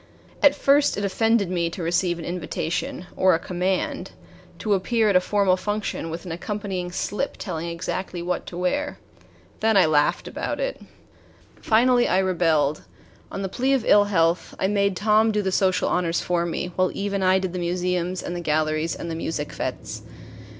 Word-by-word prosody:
At 285 -1 +6
first 285 +1 +3
it 200 - -1
offended 220 -1 +1
me 170 -2 0
to 170 +1 -6
receive 175 +1 +1
an 165 - -7
invitation 175 0 -3
or 185 -2 +4
a - - +1
command 185 +2 -2 0.4
to 210 - 0
appear 220 +3 +2
at 200 - +2
a - - +8
formal 195 -1 +2
function, 205 -3 -3
with 165 +3 -6
an 175 - -6
accompanying 185 0 -4
slip 210 +8 -3
telling 165 +1 -4
exactly 175 +2 -4
what 180 +1 -2
to 175 - -7
wear. 285 +12 -1 0.6
Then 220 -1 +3
I 190 - +6
laughed 150 -2 +2
about - - -4
it. - - -3 0.8
Finally 240 +2 +4
I - - +2
rebelled. 165 -6 +2 0.5
On 195 - -4
the - - -1
plea 255 +8 0
of 260 -4 +1
ill 205 0 +6
health, 170 -3 +1
I - - 0
made 200 -1 +1
Tom 215 +2 +3
do 210 -1 0
the 190 - 0
social 185 -1 +2
honors 170 -2 +1
for 175 -1 0
me, 180 +1 -3
while 185 0 +2
Eve 200 0 -2
and 195 -1 0
I 185 0 +4
did 190 -2 -2
the 180 - -3
museums 180 +1 -1
and 175 - -4
the 175 - -4
galleries 155 0 0
and 170 - -6
the - - -2
music 160 -2 -3
fetes. - - -5
185 Hz, 185 wpm, -24 LUFS, 170-205 Hz, 0.8 s, a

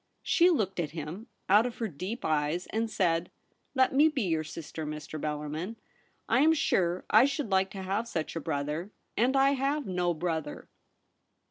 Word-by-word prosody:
She 350 +1 +4
looked 200 - 0
at 155 -3 -2
him 160 +9 -6 0.2
out 210 +5 +5
of 245 - -7
her 225 - -1
deep 190 - -5
eyes, 155 +3 0
and 225 +1 -1
said: 170 -4 +1 0.2
' - - -45
Let 260 0 +3
me 290 +4 +6
be 280 -6 -1
your 160 -4 0
sister, 160 0 -7
Mr. 150 0 -6
Bellarmin. 150 +7 -3 0.5
I - - +3
am 315 +3 +6
sure 180 - +1
I 220 +4 +7
should 280 -5 -2
like 190 0 +3
to 195 -1 -7
have 200 +5 -1
such 160 -8 -3
a - - -1
brother; 150 +4 -2 0.3
and 255 +4 +2
I 270 +1 +5
have 280 +1 0
no 180 -2 0
brother.' 160 -2 -3
185 Hz, 180 wpm, -29 LUFS, 160-240 Hz, 0.5 s, I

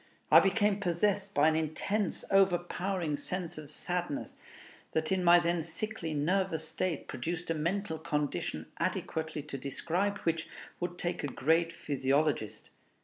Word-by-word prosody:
I - - +11
became 205 +1 +2
possessed 200 +2 0
by 145 +2 +5
an 160 - +3
intense, 160 +6 -1
overpowering 180 -3 +2
sense 180 -2 -4
of 150 -2 -8
sadness, 175 -5 -2 0.6
that 160 +1 0
in 190 -1 +2
my 175 0 +8
then 170 0 +1
sickly, 180 -3 -4
nervous 160 +1 0
state 180 -4 -2
produced 165 +6 -3
a - - +3
mental 165 +2 -1
condition 150 -3 -2
adequately 160 -2 -2
to 140 -2 -6
describe 170 +9 -1
which 165 -1 -1 0.3
would 175 0 -3
take 175 -2 -2
a - - 0
great 165 +5 +2
physiologist. 140 -5 0
170 Hz, 140 wpm, -31 LUFS, 155-185 Hz, 0.6 s, I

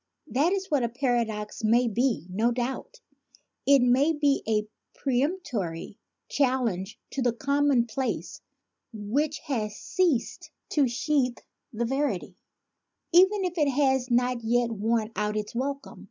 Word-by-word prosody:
That 295 +7 +1
is 385 -2 -2
what 290 -3 +3
a 235 - 0
paradox 235 -4 -2
may 235 +3 +4
be, 235 -2 0
no 215 +6 +1
doubt; 255 - -4 0.7
it 280 -2 +6
may 265 +6 +4
be 290 -2 +2
a 210 -1 +1 0.3
peremptory 250 - -2 0.3
challenge 240 -8 0
to 275 - -3
a - - +3
common 280 0 +2
place 260 +3 -3 0.5
which 250 +8 -1
has 215 -7 -2
ceased 345 - -1 0.2
to 285 -3 +3
sheathe 255 0 0 0.3
the 235 +1 -2
verity, 270 -6 -2 0.8
even 380 +3 +5
if 355 -1 -3
it 295 -2 +3
has 265 -2 +1
not 245 0 +1
yet 235 +1 +1
worn 225 +1 0
out 210 0 -1
its 210 0 -4
welcome. 275 +3 -4
250 Hz, 135 wpm, -27 LUFS, 225-280 Hz, 0.8 s, it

